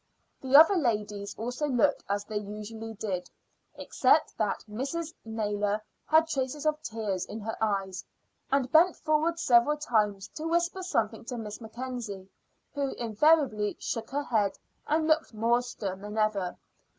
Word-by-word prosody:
The 265 +1 +1
other 325 +6 +9
ladies 210 - -1
also 250 +6 -2
looked 280 +2 +2
as 200 0 -1
they 210 0 -3
usually 215 +2 -7
did, 190 -4 -3 0.5
except - - +2
that - - -1
Mrs. 280 +9 -4
Naylor 210 -2 -1 0.3
had 315 +1 +5
traces 280 0 -2
of 305 0 +1
tears 215 -9 -3
in 220 - -6
her 225 +2 -4
eyes, 195 -3 -1 0.5
and 270 -2 +1
bent 335 +3 +6
forward 310 +2 +1
several 265 -1 +4
times 210 -8 0
to 315 +1 -5
whisper 345 +3 0
something 230 - -1
to 245 - -5
Miss 215 0 -6
Mackenzie, 225 -4 -6 0.5
who 280 -2 -1
invariably 235 -2 +2
shook 225 -1 -4
her 285 +2 -1
head 210 -7 +1 0.3
and 310 +1 +2
looked 315 -6 +1
more 235 +3 +3
stern 200 -6 -5
than 210 +1 -7
ever. 210 -4 0
230 Hz, 150 wpm, -29 LUFS, 210-295 Hz, 0.5 s, other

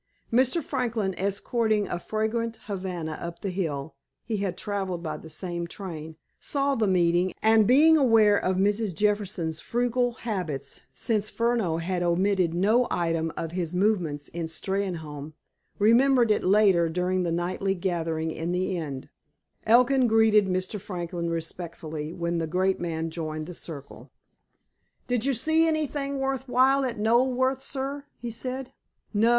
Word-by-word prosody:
Mr. 260 +7 +3
Franklin, 230 -8 -1
escorting 210 +2 0
a 175 - -3
fragrant 220 +3 -2
Havana 180 -6 -4
up 170 0 -6
the 195 - -2
hill 160 -5 -3 0.3
(he 220 -2 -2
had 195 -3 -2
traveled 190 -4 -3
by 155 -2 -3
the 160 +1 -10
same 170 +2 -4
train) 160 -4 -7 0.2
saw 280 -1 0
the 225 -5 +1
meeting, 180 0 +2
and, 220 -1 +5
being 310 +6 +6
aware 225 -6 +5
of 185 -2 +1
Mrs. 200 0 +1
Jefferson's 200 -6 0
frugal 245 0 0
habits, 175 - -4
since 215 - -1
Furneaux 230 -8 0
had 175 +2 -2
omitted 180 0 +2
no 215 +8 +3
item 165 -1 0
of 165 - -3
his 175 -1 -3
movements 180 -7 0
in 170 -1 -4
Steynholme, 160 -4 -4 0.4
remembered 235 +2 +4
it 210 - +2
later 190 -4 +4
during 180 +2 0
the 175 -2 -1
nightly 185 +3 -1
gathering 165 -3 -1
in 165 +2 -3
the 185 +1 0
inn. 140 -6 -5 0.6
Elkin 250 +3 +5
greeted 220 -2 +4
Mr. 185 +2 -2
Franklin 175 -2 -4
respectfully 160 -2 -5
when 170 0 -2
the 165 - -1
great 185 +3 +1
man 165 -1 -3
joined 155 -2 -4
the 180 - -8
circle. 150 -5 -9 1.0
"Did 245 -1 -1
you 275 -1 +2
see 320 +7 +3
anything 290 -3 -1
worth 270 -1 -2
while 265 +2 +4
at 240 -3 -3
Knoleworth, 255 +4 +2
sir?" 275 +1 -4
he 240 0 -5
said. 255 +3 -5 0.4
"No. 220 +3 +4
195 Hz, 145 wpm, -26 LUFS, 170-235 Hz, 1.0 s, being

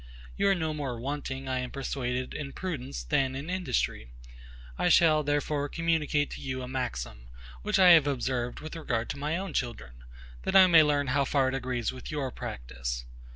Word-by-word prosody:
You 200 - +2
are 195 - +4
no 160 -3 -1
more 135 -6 -4
wanting, 135 0 -4
I 130 -1 -1
am 125 0 -3
persuaded, 125 -2 -3
in 140 -2 -5
prudence, 125 - -4
than 130 - +1
in 145 +6 -5
industry. 130 - -1 0.7
I 180 - +1
shall, 155 -2 +5
therefore, 145 0 -1
communicate 155 -3 0
to - - -7
you 130 -1 -4
a - - -5
maxim, 60 - -4 0.3
which - - +1
I 185 -2 +7
have 160 -4 +7
observed 125 -3 -2
with 155 +2 -7
regard 120 -8 -2
to 140 - -7
my 150 +3 -1
own 190 -3 -5
children, 65 - -4 0.4
that - - -2
I 190 -1 +10
may 170 -3 +7
learn 145 -2 +2
how 140 0 +3
far 135 -1 +2
it - - -4
agrees 125 -3 -2
with 130 - -9
your 145 -4 -2
practice. - - -5
135 Hz, 190 wpm, -29 LUFS, 125-155 Hz, 0.7 s, I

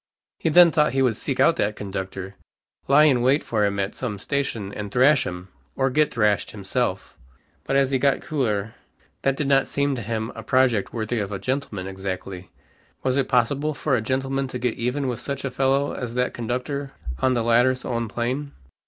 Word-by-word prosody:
He - - 0
then 170 +1 +7
thought 150 -3 +2
he 135 0 +2
would 120 -4 +2
seek - - -3
out - - +4
that 105 +1 0
conductor, 95 -1 -5 0.5
lie 140 +3 +6
in 135 -5 +4
wait 135 +5 +3
for 105 -3 +1
him 100 0 -2
at 100 0 -1
some 115 -6 -4
station, 115 -4 -3
and 105 -1 -6
thrash 130 +2 +4
him, 90 +1 -7 0.3
or 135 0 +1
get 150 +2 +2
thrashed 105 -3 +1
himself. 100 0 -3 0.5
But 135 - -1
as 135 -1 +3
he 135 - +2
got 135 0 +2
cooler, 110 -8 -1 0.5
that 135 -1 +1
did 150 - -1
not 135 -1 +3
seem 140 0 0
to 120 - -4
him 110 +1 -3
a 115 - -8
project 120 -2 +2
worthy 115 0 -2
of 100 -1 -3
a 100 - -2
gentleman 110 -3 -3
exactly. 95 -1 -6 0.5
Was 130 -1 +1
it 135 -1 +1
possible 140 +4 +1
for 145 -2 0
a 115 - 0
gentleman 135 +3 -1
to 125 - -5
get 125 -1 -1
even 130 +4 -2
with 125 -3 -3
such 140 -1 -4
a 135 - -2
fellow 135 +2 +1
as 120 -2 -5
that 125 0 0
conductor 125 +4 -3 0.3
on 130 -1 +2
the 120 - +1
letter's 125 +2 +3
own 115 -2 -2
plane? 130 +6 -3
125 Hz, 200 wpm, -24 LUFS, 105-135 Hz, 0.5 s, then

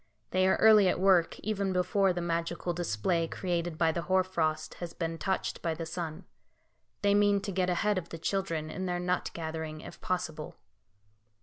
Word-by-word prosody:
They 185 0 +3
are 190 - +4
early 215 -3 +7
at 180 - +1
work, 185 -3 +3
even 200 -2 -1
before 190 +1 +2
the 175 -1 -2
magical 170 +1 -2
display 165 - 0
created 175 -2 -2
by 165 -1 +3
the 170 - -2
hoar 185 +2 +2
frost 155 -4 -1
has 175 -1 -5
been 165 -1 -3
touched 190 -1 -2
by 165 -1 -1
the 165 +1 -5
sun. 165 +1 -5 0.8
They 200 0 +4
mean 205 0 +4
to 200 - -4
get 185 -1 0
ahead 205 +2 +1
of 170 - -11
the 165 - -6
children 165 -3 -2
in 185 0 -4
their 175 0 -1
nut 180 0 -1
gathering, 160 -1 -5
if - - -11
possible. 160 -4 -3
175 Hz, 185 wpm, -30 LUFS, 165-190 Hz, 0.8 s, early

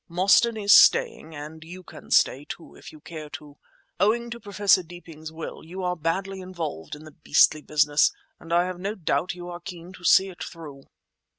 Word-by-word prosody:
Mostyn 195 +6 +3
is 205 -1 +4
staying, 160 0 +4
and 155 +2 -9
you 180 +3 -11
can - - -14
stay, 135 - +3
too, 165 - -10
if - - -13
you 155 - -15
care 155 -2 -9
to. 150 -1 -11 0.4
Owing 235 +3 +1
to 235 - -6
Professor 200 -2 +2
Deeping's 165 -2 -11
will 160 0 -8
you 185 +4 -7
are 180 0 -1
badly 190 +4 -3
involved 165 - -6
in 150 - -13
the 155 - -12
beastly 155 0 +3
business, 150 0 +2 0.3
and 165 - -12
I 175 +1 +3
have 185 -1 -5
no 200 +3 -3
doubt 180 0 -1
you 175 0 -9
are 175 0 -7
keen 175 0 -10
to 180 - -15
see 190 +2 +5
it 180 - -9
through." 145 -5 -10
175 Hz, 195 wpm, -25 LUFS, 155-190 Hz, 0.4 s, see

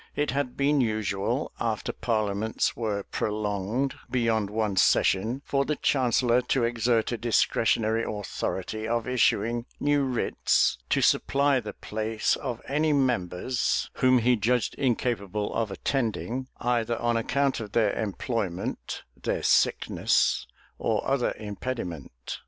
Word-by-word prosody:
It 145 - 0
had 135 -2 -2
been 140 0 +3
usual, 105 -4 -1
after - - -2
parliaments 110 -1 -1
were 105 -4 -2
prolonged 105 +6 -2 0.2
beyond 115 -4 +1
one 105 -2 -1
session, 110 +7 +2
for 140 0 +1
the 150 +2 -1
chancellor 125 -3 +2
to 125 0 0
exert 115 -1 +1
a 120 - -3
discretionary 115 -1 +2
authority 110 +1 -3
of 115 0 -1
issuing 120 -1 +1
new 145 0 +2
writs 125 -3 +1
to - - +2
supply 140 -1 +3
the 110 -3 -7
place 110 +1 -1
of 120 -3 -5
any 150 +2 +1
members 125 -4 0
whom 130 0 +5
he 125 +1 +3
judged 120 +3 +1
incapable 110 -5 -1
of 115 -2 -1
attending, 125 +3 -2
either 120 -1 0
on 120 0 0
account 135 +4 +1
of 105 -3 -7
their 110 -3 +3
employment, 100 -3 -3
their - - -3
sickness, - - +2 0.3
or 110 -2 0
other 135 -2 +1
impediment. 95 - -6
115 Hz, 125 wpm, -27 LUFS, 105-130 Hz, 0.3 s, whom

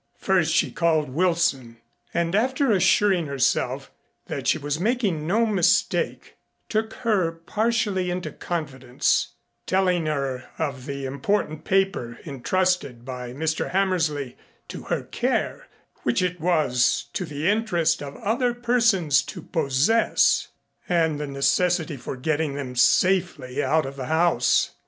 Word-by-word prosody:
First - - +1
she - - +2
called 160 -4 +1
Wilson 155 -7 0 0.3
and 170 0 -1
after 260 +4 +2
assuring 185 -2 +3
herself 135 -3 0 0.3
that - - -5
she - - +3
was 145 +2 -3
making 200 -7 0
no 220 +6 +2
mistake, 200 -6 +1 0.3
took 220 0 -1
her 190 -7 +2
partially 205 +2 -1
into 180 +1 -3
confidence, 130 -7 -1 0.3
telling 180 -3 +1
her 135 -4 -3
of 140 -4 -4
the 140 -1 -4
important 150 +3 -2
paper 190 -12 0
intrusted 140 -3 -1
by 125 -2 -6
Mr. 160 +4 -2
Hammersley 165 -9 0 0.3
to - - -7
her - - -2
care - - -2 0.3
which 120 +7 +1
it 180 -1 -2
was 155 -8 +2
to - - -2
the 150 -1 -3
interest 205 -8 +1
of 140 -1 -7
other 240 +3 0
persons 230 - +2
to - - -8
possess 160 +8 +2 0.4
and 160 -4 +1
the 150 - -3
necessity 155 +4 +1
for 130 - -6
getting 150 +1 -1
them 130 -3 -5
safely 155 -1 +2
out 160 -1 +2
of 135 +1 -7
the 130 -2 -5
house. 160 -6 +2
165 Hz, 130 wpm, -24 LUFS, 140-190 Hz, 0.4 s, assuring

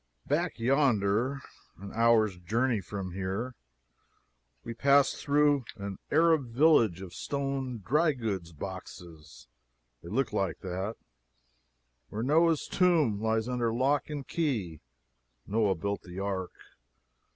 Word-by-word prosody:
Back 170 +5 0
yonder, 125 0 +2 0.4
an 100 +1 -9
hour's 115 -3 +3
journey 115 +5 0
from 95 0 -6
here, 95 +7 -3 1.1
we 115 - -5
passed 140 +3 +3
through 145 -1 +2
an 100 -2 -6
Arab 160 -3 +3
village 115 - +3
of 90 -2 -10
stone 135 -4 -3
dry 155 +4 +3
goods 100 -9 -4
boxes 80 -4 -9 0.6
(they 85 - -10
look 130 +7 -1
like 95 -2 -1
that,) 95 +4 -4 1.1
where 110 +2 -4
Noah's 160 +3 +3
tomb 160 - +2
lies 110 0 0
under 120 -2 0
lock 135 +6 +1
and 145 -3 -5
key. 110 - -2 0.6
[Noah 105 -2 +1
built 100 +4 -3
the 90 0 -11
ark. 95 -2 -2
115 Hz, 120 wpm, -29 LUFS, 95-140 Hz, 1.1 s, hour's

